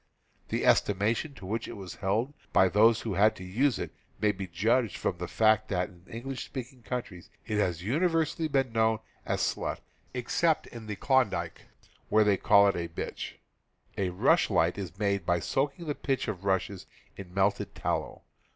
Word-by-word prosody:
The - - -1
estimation 110 +9 +2
in 95 - -9
which 110 +3 -2
it - - -7
was 95 -2 -8
held 110 +8 0 0.2
by 95 - +5
those 110 +3 +5
who 110 - -3
had 105 +4 +4
to 95 - -9
use 115 +7 +1
it - - -5 0.3
may 105 - +3
be 95 -1 -6
judged 110 +6 +1
from 85 - -2
the 90 - -3
fact 110 +1 +3
that 90 -2 0
in 90 0 -19 0.2
Enghsh 135 -1 -4
speaking 130 -1 -7
countries 105 -6 -5 0.2
it 105 -1 -1
has 85 -4 0
universally 160 - +1
been 135 -4 +1
known 110 -1 +3 0.3
as - - 0
a - - -12
"slut," - - -2 0.4
except 155 +6 +1
in 115 -2 -10
the 105 - -3
Klondike, 100 - 0 0.4
where 110 0 +5
they 105 -2 +3
call 100 0 +6
it 100 - +2
a 85 -1 -2
"bitch." 80 - -5 0.6
A 95 -2 0
rush 90 - +3
light 85 +2 +2
is 95 -3 -6
made 100 -2 0
by 85 0 +1
soaking 140 - -1
the 150 - -1
pith 135 -3 -2
of 100 -3 -4
rushes 95 0 -1 0.3
in 90 -2 -9
melted 100 +2 0
tallow. - - -3
105 Hz, 185 wpm, -29 LUFS, 95-125 Hz, 0.6 s, call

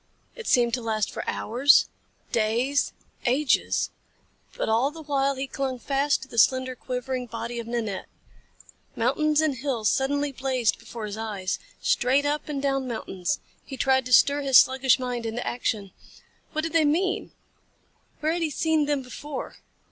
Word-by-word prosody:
It 465 -2 -8
seemed 240 -2 +3
to 250 - 0
last 220 -2 -1
for - - -5
hours, 260 +6 +4 0.4
days, 235 +6 +1 0.4
ages. 265 +3 +2 0.7
But - - -1
all 230 +5 +2
the 320 +1 -10
while 275 -1 +1
he 265 +1 -3
clung 265 -1 -3
fast 275 +3 0
to - - -11
the 230 - -2
slender, 260 +2 +3
quivering 250 0 -4
body 235 +1 -5
of 230 - -6
Nanette. 225 -5 -3 0.9
Mountains 300 +6 +2
and 300 -4 0
hills 240 -5 0
suddenly 285 +2 0
blazed 255 -3 0
before 230 -2 -7
his 210 0 -6
eyes. 205 -4 -3 0.2
Straight 265 +4 +2
up 295 +1 -1
and 290 -2 -2
down 270 -1 0
mountains. 195 -5 -3 0.2
He 270 - -8
tried 265 -1 +2
to - - -7
stir 285 +3 +6
his 270 -2 +6
sluggish 265 -1 +5
mind 245 -3 -3
into 225 +2 -4
action. 215 -5 -2 0.6
What 310 - 0
did 330 - -3
they 330 -1 +4
mean? 365 +7 0 0.9
Where 310 +1 +1
had 345 - -2
he 325 - +1
seen 315 0 +1
them 290 -2 0
before? 270 +2 -7
260 Hz, 165 wpm, -26 LUFS, 235-285 Hz, 0.9 s, stir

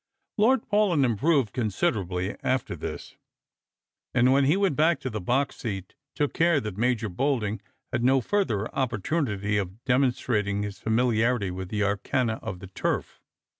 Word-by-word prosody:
Lord 235 +3 +3
Paulyn 205 -9 +3
improved 130 0 +2
considerably 100 -4 -1
after 130 -1 -1
this, - - -7 1.0
and 125 +1 +5
when 140 0 +4
he 150 +7 +3
went 195 -7 +1
back 155 +1 +3
to 130 - -3
the 110 -1 -4
box 130 +9 0
seat 95 -5 -5 0.2
took 145 -2 0
care 165 -2 +3
that 105 -7 -5
Major 115 0 0
Bolding 105 -1 -1 0.3
had 120 - 0
no 130 +2 +4
farther 120 - 0
opportunity 110 - -1
of 100 +4 -6
demonstrating 120 -6 +1
his 105 -1 -6
familiarity 115 -2 +1
with 90 0 -6
the 105 0 0
arcana 110 +4 0
of 90 -2 -6
the 95 - -8
turf. - - -3
120 Hz, 150 wpm, -26 LUFS, 105-140 Hz, 1.0 s, and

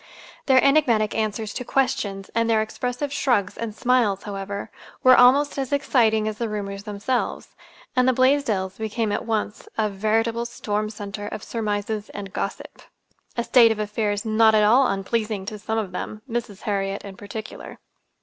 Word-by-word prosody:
Their 260 -2 +5
enigmatic 250 -7 +3
answers 215 0 -2
to 250 - -4
questions, 250 -7 -1
and 230 0 +1
their 220 -1 +3
expressive 250 +5 -4
shrugs 240 -9 +1
and 225 -2 -5
smiles, 235 -6 +2
however, 200 0 -5 0.3
were 255 0 +8
almost 275 +4 +5
as 265 -2 -3
exciting 225 -6 +2
as 215 -1 -4
the 230 -2 -1
rumors 200 -1 -5
themselves; 210 +5 -2 0.5
and 255 0 +3
the - - +6
Blaisdells 255 -8 +1
became 220 0 -1
at 205 - -2
once 215 -1 -2
a 215 -1 +1
veritable 225 +3 0
storm 215 -2 -2
center 205 -1 -6
of 210 - -6
surmises 210 -1 -3
and 200 -2 -7
gossip—a 235 - -7
state 235 -2 +6
of 220 - -1
affairs 210 0 -2
not 220 0 +4
at 215 - +5
all 245 +5 +5
unpleasing 200 +1 -2
to 210 0 -6
some 220 +2 -2
of 210 -4 -2
them, 215 +4 -6
Mrs. 230 -4 -4
Harriet 195 -1 -2
in 195 -1 -8
particular. 205 +2 -8
220 Hz, 160 wpm, -23 LUFS, 205-240 Hz, 0.5 s, were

